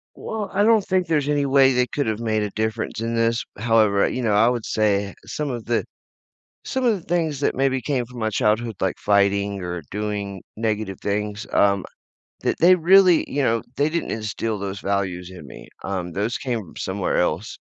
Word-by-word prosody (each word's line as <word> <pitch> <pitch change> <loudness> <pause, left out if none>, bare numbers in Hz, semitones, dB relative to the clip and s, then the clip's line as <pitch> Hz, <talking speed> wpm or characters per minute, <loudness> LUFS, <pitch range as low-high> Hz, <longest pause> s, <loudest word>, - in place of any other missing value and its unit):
Well, 215 -2 -5
I 200 +1 +3
don't 220 -1 +4
think 185 -2 +1
there's 150 -3 +1
any 145 -1 +1
way 135 -1 +5
they 125 0 +2
could 145 -1 -2
have 110 0 -1
made 110 -2 0
a 105 - -2
difference 110 +1 -2
in 115 0 -2
this. 115 0 +1
However, 110 -2 +3
you 130 - -3
know, 110 -4 +1
I 110 +3 +5
would 120 -3 -2
say 100 -2 +1
some 150 -1 -3
of 120 -3 -5
the 120 -1 0 0.8
some 260 -1 -2
of 235 -3 +4
the - - -21
things 160 -5 0
that - - +1
maybe 130 -1 +1
came 130 -5 -1
from 125 0 -10
my 110 0 0
childhood, 110 +2 +1
like 95 - 0
fighting 100 -1 +2
or 90 -1 -4
doing 100 -2 -4
negative 105 -3 -2
things, 105 +1 -2
um, 100 -2 +3 0.6
that - - 0
they 175 +2 +7
really 180 0 +5
you 145 0 0
know, 115 -2 +2
they 145 +2 +2
didn't 170 +2 -2
instill 110 0 -3
those 100 0 -5
values 95 -3 -2
in 90 -5 -11
me. 65 - -12 0.2
Um, 90 -3 -3
those 105 +6 -1
came 125 -4 -2
from 95 -7 -12
somewhere 95 0 -1
else. 90 +3 -1
110 Hz, 200 wpm, -22 LUFS, 100-135 Hz, 0.8 s, they